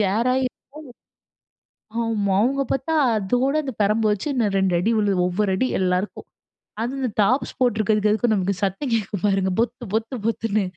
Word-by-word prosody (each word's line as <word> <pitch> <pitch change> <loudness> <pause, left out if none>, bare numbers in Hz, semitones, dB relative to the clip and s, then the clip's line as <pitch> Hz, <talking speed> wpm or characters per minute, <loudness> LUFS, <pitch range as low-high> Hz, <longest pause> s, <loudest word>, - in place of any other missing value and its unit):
கேராயி 235 +6 +1 1.3
இருக்கும். 230 +2 -7
ஆமா. 205 -4 0
அவங்க 275 +3 +1
பார்த்தா 270 +5 -1 0.2
அதோட 245 +7 0
அந்த 265 - -4
பெரம்பு 215 +2 +2
வச்சு 205 +7 -2
இன்னும் 220 -6 0
2 190 -1 +1
அடி 215 +6 +1
விழுவும், 195 -4 +2
ஒவ்வொரு 195 +3 0
அடி 255 - +1
எல்லாருக்கும். 185 +2 -1 0.5
அதுவும் 250 +4 -3
இந்த 250 - -1
டாப்ஸ் 255 +8 0
போட்டு 245 -4 +2
இருக்கதுக்கு 210 0 +2
அதுக்கும் 220 +1 +2
நமக்கு 195 0 0
சத்தம் 200 +8 -1
கேட்கும் 205 -3 -3
பாருங்க, 195 -1 +1
பொத்து 240 +1 -3
பொத்து 225 +4 -1
பொத்துனு. 220 -2 0
215 Hz, 160 wpm, -22 LUFS, 200-245 Hz, 1.3 s, பெரம்பு